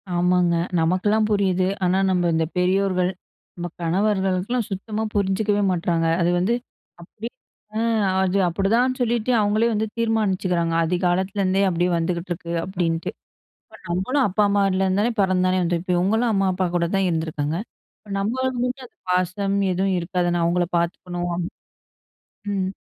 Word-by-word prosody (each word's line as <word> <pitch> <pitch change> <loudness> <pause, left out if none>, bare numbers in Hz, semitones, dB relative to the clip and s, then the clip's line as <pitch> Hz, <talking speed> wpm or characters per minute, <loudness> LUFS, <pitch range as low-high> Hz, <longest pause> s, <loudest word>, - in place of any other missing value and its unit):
ஆமாங்க. 175 0 +3 0.2
நமக்கெல்லாம் 195 +6 +2
புரியுது. 190 -3 +2 0.2
ஆனா 180 +1 +2
நம்ம 175 -2 +2
இந்த 160 0 +1
பெரியோர்கள், 185 0 +2 0.4
நம்ம 175 0 -4
கணவர்களுக்கெல்லாம் 195 +5 0
சுத்தமா 210 +3 -3
புரிஞ்சுக்கவே 205 +1 +1
மாட்றாங்க. 170 -2 0
அது 170 - +3
வந்து 190 +6 +1 0.5
அப்படியே 220 +7 -8 0.5
ஆ - - +1 0.4
அது 190 +1 +1
அப்படிதான் 225 +9 +1
சொல்லிட்டு, 240 0 0
அவங்களே 210 +2 +2
வந்து 215 +1 0
தீர்மானிச்சுக்கிறாங்க. 190 -7 0
ஆதிகாலத்துலேருந்தே 185 +3 +1
அப்படியே 175 +1 +1
வந்துகிட்டுருக்கு 170 0 -3
அப்படின்ட்டு. 170 -3 -2 0.6
அப்ப - - -11
நம்மளும் 190 +11 +1
அப்பா, 205 +2 +1
அம்மாலருந்து 195 -1 +2
தானே 235 - +2
பிறந்து 185 -1 +2
தானே 185 0 +2
வந்துருப்போம். 175 +1 0
இவங்களும் 220 +6 +2
அம்மா 195 -1 +2
அப்பா 185 0 0
கூட 170 -1 +2
தான் 195 -1 +2
இருந்துருக்காங்க. 160 -2 -2 0.4
இப்போ 205 - -13
நம்மளுக்கு 250 +5 -1
மட்டும் 255 +1 -4
அந்த - - -40
பாசம் 185 +2 0
எதுவும் 190 +1 +1
இருக்காது 175 +1 -1
நான் 175 -1 +1
அவங்களை 175 +1 +1
பார்த்துக்கணும். 175 0 -2 1.1
ம். 190 -2 0
185 Hz, 135 wpm, -23 LUFS, 175-205 Hz, 1.1 s, ஆமாங்க